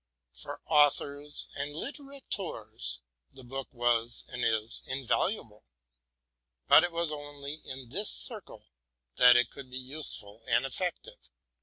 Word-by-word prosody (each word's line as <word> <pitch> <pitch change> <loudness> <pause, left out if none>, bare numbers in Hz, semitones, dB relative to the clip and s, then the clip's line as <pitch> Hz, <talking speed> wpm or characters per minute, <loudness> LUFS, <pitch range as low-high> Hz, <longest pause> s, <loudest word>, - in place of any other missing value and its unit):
For - - -8
authors 145 -1 +2
and 145 +1 -4
littéra 275 - -7
teurs, 115 - -3 0.3
the 130 - -14
book 135 +2 -6
was 120 -2 0
and 125 -2 -4
is 110 0 0
invaluable; 130 - -1 1.0
but - - +8
it 175 - 0
was 170 -1 0
only 145 0 -6
in 130 -2 -6
this 200 - +2
circle - - -3 0.5
that 125 0 +8
it 120 - +2
could 140 -2 -10
be 130 - -6
useful 130 -6 +2
and 130 - +2
effective. 185 - -5
140 Hz, 130 wpm, -30 LUFS, 120-155 Hz, 1.0 s, but